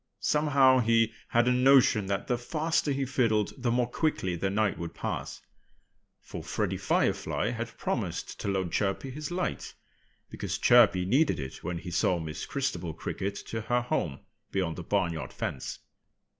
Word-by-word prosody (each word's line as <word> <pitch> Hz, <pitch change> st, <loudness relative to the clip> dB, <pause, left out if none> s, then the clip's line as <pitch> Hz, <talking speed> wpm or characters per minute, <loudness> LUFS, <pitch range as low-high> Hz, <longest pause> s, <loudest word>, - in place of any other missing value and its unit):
Somehow 140 Hz, -4 st, +4 dB
he 115 Hz, -1 st, +3 dB
had 120 Hz, +1 st, +2 dB
a -, -, +4 dB
notion 125 Hz, -5 st, +5 dB
that 100 Hz, 0 st, -1 dB
the 125 Hz, -, +1 dB
faster 155 Hz, +4 st, 0 dB
he 135 Hz, 0 st, 0 dB
fiddled 115 Hz, -5 st, +1 dB
the 125 Hz, -3 st, -2 dB
more 120 Hz, 0 st, +2 dB
quickly 120 Hz, -, -1 dB
the 95 Hz, +3 st, -1 dB
night 105 Hz, 0 st, 0 dB
would 85 Hz, -1 st, -6 dB
pass. -, -, -4 dB, 0.8 s
For -, -, -7 dB
Freddie -, -, -2 dB
Firefly 110 Hz, -, 0 dB
had 115 Hz, -1 st, -5 dB
promised -, -, -3 dB
to -, -, -4 dB
loan 95 Hz, -3 st, -1 dB
Chirpy 105 Hz, +6 st, -1 dB
his 150 Hz, +3 st, -5 dB
light, 180 Hz, +1 st, -3 dB, 0.6 s
because -, -, -3 dB
Chirpy 110 Hz, -7 st, +5 dB
needed 135 Hz, -, +2 dB
it 65 Hz, -2 st, -7 dB
when 90 Hz, -1 st, -3 dB
he 90 Hz, +1 st, -7 dB
saw 90 Hz, +1 st, +2 dB
Miss 80 Hz, -2 st, -5 dB
Christabel 130 Hz, -, -2 dB
Cricket 100 Hz, +1 st, -4 dB
to 115 Hz, -, -4 dB
her 120 Hz, +3 st, +1 dB
home 70 Hz, -, -2 dB, 0.3 s
beyond 90 Hz, -4 st, -1 dB
the 90 Hz, -, -5 dB
barnyard 85 Hz, -4 st, -1 dB
fence. -, -, -4 dB
115 Hz, 160 wpm, -29 LUFS, 95-130 Hz, 0.8 s, notion